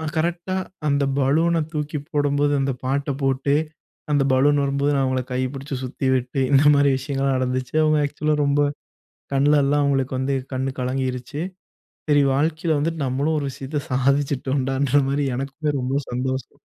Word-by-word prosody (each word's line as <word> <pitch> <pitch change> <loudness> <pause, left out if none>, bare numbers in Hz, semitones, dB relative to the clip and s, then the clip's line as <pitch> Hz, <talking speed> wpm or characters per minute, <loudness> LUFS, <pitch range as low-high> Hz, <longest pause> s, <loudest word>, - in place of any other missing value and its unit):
கரெக்ட்டா 170 +3 -1 0.3
அந்த 140 -1 +2
பலூன 160 +5 +2
தூக்கி 150 0 -3
போடும்போது. 145 -1 +1
அந்த 135 0 0
பாட்ட 140 +2 -1
போட்டு 135 +1 +1 0.6
அந்த 145 -1 +3
பலூன் 145 +3 +4
வரும்போது 140 +1 +1
நான் 135 - +2
அவங்கள 130 -1 0
கை 125 - -1
பிடிச்சு 135 +1 -5
சுத்திவிட்டு 130 0 -1
இந்த 140 0 +5
மாரி 140 0 +4
விஷயங்கள்லாம் 135 0 -1
நடந்துச்சு. 130 0 -2
அவங்க 155 0 +3
ஆக்சுவலா 150 +1 -1
ரொம்ப 140 +1 +2 0.7
கண்ல 145 +2 +4
எல்லாம் 145 +1 +2
அவங்களுக்கு 135 -2 0
வந்து 135 +1 0 0.2
கண் 130 0 -2
கலங்கிடுச்சு. 130 +2 -3 0.7
"சரி 145 -1 +4
வாழ்க்கையில 155 +2 +1
வந்துட்டு 160 0 -1
நம்மளும் 140 +5 0
ஒரு 140 - -3
விஷயத்த 140 +3 -4
சாதிச்சிட்டோம்ண்டன்ற" 135 0 +1
மாரி 140 +1 0
எனக்குமே 140 +3 -2
ரொம்ப 130 +1 -2
சந்தோஷம். 130 +2 -3
140 Hz, 145 wpm, -22 LUFS, 130-145 Hz, 0.7 s, இந்த